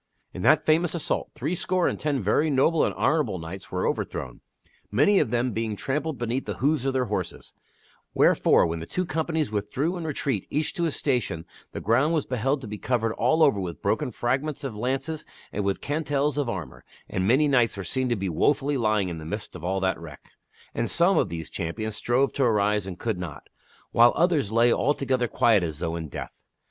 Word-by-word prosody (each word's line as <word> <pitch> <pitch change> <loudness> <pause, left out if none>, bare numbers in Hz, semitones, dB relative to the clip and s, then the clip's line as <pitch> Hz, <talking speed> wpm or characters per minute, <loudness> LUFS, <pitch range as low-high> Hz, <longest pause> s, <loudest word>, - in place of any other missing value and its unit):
In - - -6
that - - +4
famous 160 +2 +2
assault 165 - -2
threescore 180 +5 0
and - - -2
ten 145 -6 -1
very 145 +10 +2
noble 150 +4 +3
and - - +1
honorable 150 -12 +1
knights 85 +3 -8
were 90 0 -1
overthrown, - - -3 0.5
many 150 - +4
of 140 - +1
them 120 +2 0
being 110 -1 -2
trampled 145 +6 -2
beneath 120 +2 -2
the - - -3
hoofs 140 0 +1
of 135 - +1
the 130 -1 +1
horses; 95 -5 -4 0.6
wherefore, - - +4
when 85 0 -2
the 80 - -7
two 185 - -2
companies 160 -3 -1
withdrew 125 - -1
in 170 - -5
retreat 135 - -2
each 150 +1 -1
to 170 - -1
his 160 - -1
station 120 - -1 0.3
the - - -5
ground 130 +9 +2
was 155 - 0
beheld 135 +3 -1
to 125 - -7
be 105 0 -6
covered 115 -3 0
all 145 +9 +3
over 140 -10 +4
with 85 -5 -5
broken - - 0
fragments 135 +5 -2
of 130 -6 -4
lances 135 +7 -2 0.3
and 105 - -1
with 100 0 -1
cantels 145 -1 0
of 145 -4 -1
armor, 85 - -6 0.2
and 95 0 -1
many 135 +7 +4
knights 120 -6 +2
were 100 - -4
seen 130 +8 -1
to 120 - +2
be 100 -2 -3
wofully 140 - +1
lying 110 -5 +1
in 85 -2 -5
the - - -8
midst 100 +6 -6
of 85 - -9
all 95 +2 0
that 95 -2 0
wreck. 80 -4 -12 0.4
And 115 - -1
some 175 +3 +4
of - - +1
these 80 -1 -6
champions 110 +6 -3
strove 130 +5 +1
to 140 - +1
arise 105 -3 +2
and 90 -2 -6
could 110 -6 -2
not, 85 -6 -7 0.4
while 120 +1 +6
others 160 - +2
lay 115 +1 +4
alto 145 +2 +1
gether 130 -2 +1
quiet 110 -3 +3
as 80 -4 -3
though 80 0 -2
in 80 -2 -4
death. - - -6
120 Hz, 210 wpm, -26 LUFS, 100-145 Hz, 0.6 s, while